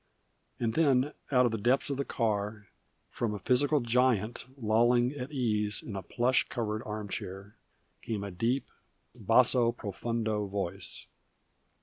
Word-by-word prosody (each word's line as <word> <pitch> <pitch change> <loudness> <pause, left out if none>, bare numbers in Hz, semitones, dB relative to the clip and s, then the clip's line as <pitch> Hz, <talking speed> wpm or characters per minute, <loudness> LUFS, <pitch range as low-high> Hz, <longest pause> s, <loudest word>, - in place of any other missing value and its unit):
And 115 -2 0
then 145 -3 +3 0.2
out 125 -2 +5
of 120 - +1
the 110 - -2
depths 130 +6 +2
of 140 - -2
the 140 - -1
car, 105 -3 -2 0.4
from 110 -3 -2
a - - -3
physical 135 +8 +3
giant 120 -2 +1
lolling 120 +1 +3
at 140 -1 -6
ease 105 -6 0
in 105 - -7
a 95 - -3
plush 120 +7 +1
covered 110 -2 -2
arm 105 -1 -4
chair, 100 +1 -6 0.5
came 105 -3 -3
a 100 - -5
deep, 115 +9 -1 0.4
basso 120 -2 +4
profundo 110 0 -2
voice. 100 -3 -4
115 Hz, 140 wpm, -30 LUFS, 105-125 Hz, 0.5 s, out